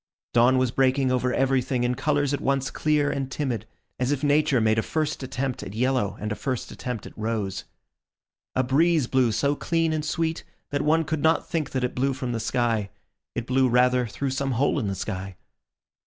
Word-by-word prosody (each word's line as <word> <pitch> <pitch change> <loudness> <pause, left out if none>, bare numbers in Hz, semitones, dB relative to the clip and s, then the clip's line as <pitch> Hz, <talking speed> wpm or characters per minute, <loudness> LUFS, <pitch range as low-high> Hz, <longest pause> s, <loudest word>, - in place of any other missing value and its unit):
Dawn 120 +2 +5
was 130 -2 +2
breaking 130 0 +2
over 125 0 +1
everything 130 -1 +1
in 120 0 +1
colours 145 +1 0
at 140 - -1
once 135 0 0
clear 150 -1 +1
and 135 -1 -3
timid; 120 -8 -2 0.3
as 125 +2 +1
if 145 0 -1
Nature 145 -2 +3
made 110 0 +3
a - - +2
first 155 +4 -2
attempt 130 -1 -3
at 95 - -7
yellow 125 -3 0
and 105 0 -3
a - - -1
first 130 0 -3
attempt 125 -4 -5
at - - -11
rose. 105 -3 -3 0.9
A 130 - +3
breeze 155 +3 +3
blew 125 -1 +2
so 140 +6 +1
clean 165 +2 0
and 155 -1 -1
sweet, 160 +1 -1 0.3
that 145 0 0
one 160 +2 +3
could 155 -1 -2
not 160 +2 +2
think 160 -3 -2
that 130 -1 -2
it 125 - -1
blew 135 +2 +1
from 130 -1 -4
the 115 - -2
sky; 115 -3 0 0.5
it 120 - -2
blew 130 0 +2
rather 125 0 +3
through 135 +5 -3
some 135 0 -1
hole 140 +4 +1
in 110 - -2
the 100 - -2
sky. 95 -1 -5
130 Hz, 200 wpm, -25 LUFS, 120-145 Hz, 0.9 s, Dawn